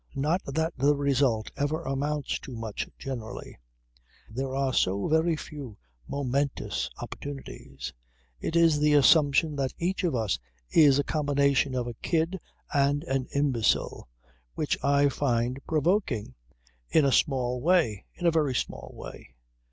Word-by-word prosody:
Not 155 Hz, +7 st, +1 dB
that 160 Hz, +4 st, -1 dB
the 145 Hz, +3 st, +3 dB
result 135 Hz, -6 st, +1 dB
ever 155 Hz, +3 st, -1 dB
amounts 145 Hz, +1 st, -2 dB
to 130 Hz, -, -9 dB
much 115 Hz, -2 st, -4 dB
generally. 120 Hz, -, -7 dB, 0.7 s
There 130 Hz, +3 st, -3 dB
are 135 Hz, -1 st, 0 dB
so 100 Hz, -1 st, +1 dB
very 160 Hz, +1 st, +2 dB
few 140 Hz, -8 st, -8 dB, 0.3 s
momentous 140 Hz, 0 st, -1 dB
opportunities. 135 Hz, -, -7 dB, 0.5 s
It 160 Hz, -, -3 dB
is 165 Hz, -3 st, +5 dB
the 150 Hz, 0 st, +4 dB
assumption 145 Hz, +1 st, +5 dB
that 135 Hz, -2 st, -2 dB
each 185 Hz, +3 st, -1 dB
of 165 Hz, -7 st, +1 dB
us 110 Hz, -, 0 dB, 0.3 s
is 145 Hz, -4 st, +6 dB
a 145 Hz, -, +2 dB
combination 140 Hz, -3 st, +1 dB
of 125 Hz, -1 st, -1 dB
a 120 Hz, -, -5 dB
kid 165 Hz, -, -1 dB, 0.3 s
and 145 Hz, +1 st, +2 dB
an 135 Hz, -5 st, -1 dB
imbecile 130 Hz, -, +1 dB, 0.5 s
which 150 Hz, -, 0 dB
I 140 Hz, 0 st, +4 dB
find 125 Hz, -2 st, 0 dB
provoking 155 Hz, -, 0 dB, 0.6 s
in 155 Hz, -, +4 dB
a 135 Hz, -, +3 dB
small 125 Hz, -2 st, +1 dB
way; 160 Hz, -, +2 dB
in 175 Hz, -, -5 dB
a 170 Hz, -, +5 dB
very 150 Hz, -5 st, +1 dB
small -, -, -3 dB
way. 60 Hz, -, -11 dB
140 Hz, 140 wpm, -27 LUFS, 130-155 Hz, 0.7 s, is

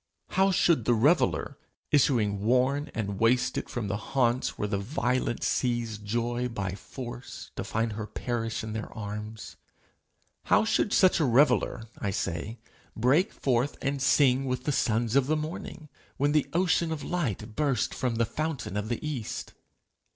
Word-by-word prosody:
How 190 Hz, +1 st, +3 dB
should 170 Hz, -, +3 dB
the 120 Hz, -, +4 dB
reveller, 115 Hz, -, +2 dB, 0.3 s
issuing 115 Hz, -8 st, +3 dB
worn 130 Hz, +5 st, +2 dB
and 100 Hz, -3 st, -3 dB
wasted 125 Hz, +2 st, +2 dB
from 120 Hz, -4 st, -3 dB
the 100 Hz, +1 st, -1 dB
haunts 120 Hz, +2 st, 0 dB
where 105 Hz, -, -1 dB
the 100 Hz, -1 st, -1 dB
violent 120 Hz, +2 st, -1 dB
seize 120 Hz, -3 st, 0 dB
joy 120 Hz, +3 st, -1 dB
by 100 Hz, -5 st, -3 dB
force 120 Hz, +4 st, -8 dB
to -, -, -3 dB
find 115 Hz, 0 st, -1 dB
her 105 Hz, 0 st, -5 dB
perish 115 Hz, -2 st, -3 dB
in 110 Hz, 0 st, -5 dB
their 110 Hz, 0 st, -5 dB
arms 105 Hz, +1 st, -6 dB, 0.9 s
how -, -, +4 dB
should 220 Hz, -2 st, +1 dB
such 185 Hz, -2 st, +4 dB
reveller, 135 Hz, -4 st, +3 dB, 0.2 s
I 100 Hz, -, -1 dB
say, 95 Hz, +4 st, -3 dB, 0.4 s
break 135 Hz, -, +3 dB
forth 130 Hz, +1 st, 0 dB
and 140 Hz, 0 st, -2 dB
sing 135 Hz, -1 st, +4 dB
with 125 Hz, -1 st, -2 dB
the 150 Hz, -, 0 dB
sons 115 Hz, -2 st, +1 dB
of 135 Hz, -1 st, +4 dB
the 155 Hz, +1 st, +2 dB
morning, 155 Hz, 0 st, -6 dB, 0.3 s
when 145 Hz, +1 st, +2 dB
the 150 Hz, -1 st, +2 dB
ocean 170 Hz, -1 st, +2 dB
of 155 Hz, -2 st, -4 dB
light 115 Hz, -, -3 dB
bursts 140 Hz, -7 st, 0 dB
from 125 Hz, -3 st, -1 dB
the 115 Hz, +1 st, +2 dB
fountain 155 Hz, -, -3 dB
of 105 Hz, +1 st, -2 dB
the 120 Hz, +5 st, -3 dB
east? 130 Hz, -8 st, -4 dB
120 Hz, 160 wpm, -28 LUFS, 110-145 Hz, 0.9 s, the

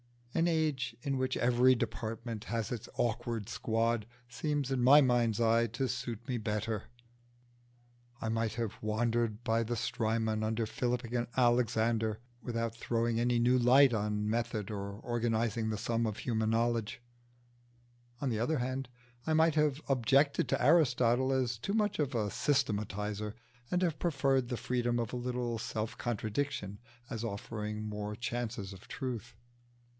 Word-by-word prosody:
An 165 Hz, +1 st, +2 dB
age 155 Hz, -8 st, 0 dB
in 135 Hz, -1 st, 0 dB
which 130 Hz, 0 st, 0 dB
every 125 Hz, +1 st, +4 dB
department 115 Hz, -1 st, -4 dB
has 115 Hz, -3 st, -2 dB
its 120 Hz, -4 st, -5 dB
awkward 115 Hz, -2 st, -1 dB
squad 115 Hz, -1 st, 0 dB, 0.2 s
seems 135 Hz, +3 st, -2 dB
in 130 Hz, -2 st, +1 dB
my 135 Hz, +4 st, +8 dB
mind's 120 Hz, -5 st, +3 dB
eye 115 Hz, 0 st, +4 dB
to 115 Hz, +4 st, -2 dB
suit 120 Hz, -2 st, -4 dB
me 125 Hz, -2 st, -1 dB
better. 105 Hz, 0 st, -2 dB, 1.3 s
I -, -, -3 dB
might 115 Hz, 0 st, 0 dB
have 115 Hz, -3 st, -4 dB
wandered 115 Hz, +1 st, 0 dB
by 115 Hz, 0 st, +2 dB
the 120 Hz, +1 st, -2 dB
Strymon 110 Hz, -1 st, 0 dB
under 110 Hz, +1 st, 0 dB
Philip 125 Hz, +2 st, -1 dB
and 120 Hz, 0 st, -2 dB
Alexander 115 Hz, -3 st, +2 dB, 0.2 s
without 115 Hz, -2 st, -2 dB
throwing 115 Hz, 0 st, 0 dB
any 120 Hz, 0 st, +2 dB
new 125 Hz, +2 st, +4 dB
light 130 Hz, +2 st, +6 dB
on 105 Hz, -1 st, -1 dB
method 110 Hz, -2 st, -1 dB
or 100 Hz, -1 st, -4 dB
organising 115 Hz, -1 st, 0 dB
the 110 Hz, -, -1 dB
sum 115 Hz, +2 st, 0 dB
of 110 Hz, -, -4 dB
human 110 Hz, -3 st, 0 dB
knowledge; 115 Hz, 0 st, 0 dB, 1.2 s
on 140 Hz, -, 0 dB
the 110 Hz, -3 st, -1 dB
other 150 Hz, +7 st, +1 dB
hand, 130 Hz, +1 st, -2 dB, 0.4 s
I 160 Hz, -, +2 dB
might 160 Hz, 0 st, +4 dB
have 150 Hz, -1 st, +2 dB
objected 135 Hz, +2 st, +3 dB
to -, -, +1 dB
Aristotle 130 Hz, -4 st, +4 dB
as 125 Hz, -3 st, 0 dB
too 195 Hz, -, -3 dB
much 210 Hz, -4 st, +1 dB
of 140 Hz, -3 st, 0 dB
a 105 Hz, -3 st, 0 dB
systematiser, 105 Hz, -5 st, -1 dB, 0.4 s
and 180 Hz, +1 st, +1 dB
have 165 Hz, -3 st, 0 dB
preferred 135 Hz, -6 st, +1 dB
the 120 Hz, -, -3 dB
freedom 120 Hz, -1 st, 0 dB
of 115 Hz, -1 st, -2 dB
a -, -, -1 dB
little 120 Hz, -2 st, -2 dB
self 110 Hz, 0 st, -3 dB
contradiction 110 Hz, -2 st, -2 dB, 0.3 s
as 115 Hz, -4 st, -4 dB
offering 105 Hz, 0 st, -4 dB
more 105 Hz, 0 st, -4 dB
chances 115 Hz, -4 st, -3 dB
of 95 Hz, +2 st, -14 dB
truth. 120 Hz, -4 st, -5 dB
120 Hz, 150 wpm, -32 LUFS, 110-125 Hz, 1.3 s, my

